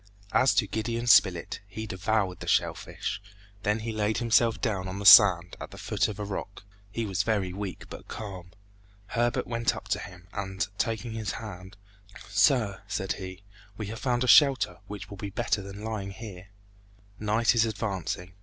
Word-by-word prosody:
As 130 -5 +4
to 105 - +3
Gideon 115 +3 -3
Spilett, 95 -7 +4
he 110 +3 -6
devoured 95 -1 -1
the - - -8
shell - - +2
fish, 95 +1 -5 0.4
then 105 +2 0
he 115 +1 -3
laid 110 0 0
himself 115 -1 +3
down 100 -6 -1
on 95 +1 -5
the 100 - -5
sand, 90 -5 +8
at - - -6
the - - -12
foot - - 0
of 105 - -6
a 105 - -4
rock. 100 0 -6 0.3
He 115 +2 -3
was 95 -2 0
very 100 -4 0
weak, 100 -1 -6
but - - -10
calm. 95 -5 -7 0.6
Herbert 120 0 0
went 115 0 0
up - - -9
to - - +1
him, 90 0 -11
and 95 -1 -2
taking 115 0 -1
his 110 -1 -3
hand, 95 -2 -8 0.5
"Sir," 110 -9 +2
said 95 -2 -2
he, 95 +1 -8 0.3
"we 110 - -4
have 115 - -8
found 125 -2 0
a - - -1
shelter 135 -1 +5
which 105 -1 -7
will 100 - -8
be 100 +1 -5
better 105 0 -1
than 100 +2 -9
lying 110 -3 -4
here. 95 -2 -9 0.7
Night 110 +2 +2
is 115 -1 +3
advancing. 95 -4 -4
105 Hz, 180 wpm, -28 LUFS, 95-115 Hz, 0.7 s, sand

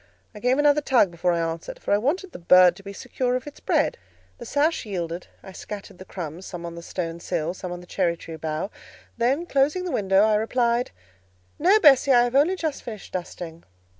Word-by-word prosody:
I - - -10
gave 250 +4 +2
another 295 0 +4
tug 245 -10 +3
before 175 +1 0
I 170 - 0
answered, 165 0 -7
for - - -1
I 205 - +4
wanted 345 - -1
the - - -9
bird 180 0 +6
to 195 - -13
be 200 0 -8
secure 250 +5 -2
of 255 - -3
its 295 - -10
bread: - - 0 0.4
the 240 - -8
sash 300 +5 +1
yielded; 175 -4 -5 0.2
I 190 - -10
scattered 200 -1 -9
the 185 - -10
crumbs, 175 -1 -7
some 175 -1 -7
on 170 - -6
the 170 - -8
stone 170 -1 -5
sill, 170 -1 -2
some 185 -1 -7
on 175 0 -6
the - - -13
cherry 175 -2 0
tree 165 0 -9
bough, 155 +5 -3 0.5
then, 270 +8 +1
closing 300 +4 +1
the 355 - -3
window, 195 -1 +3
I 215 0 +3
replied— 235 +2 +1 0.7
"No, 380 +7 +5
Bessie; 280 -5 +6
I 240 -2 +6
have 245 0 -1
only 305 +7 +4
just 315 -5 -3
finished 215 -5 -9
dusting." 175 -2 -6
205 Hz, 215 wpm, -24 LUFS, 175-270 Hz, 0.7 s, bird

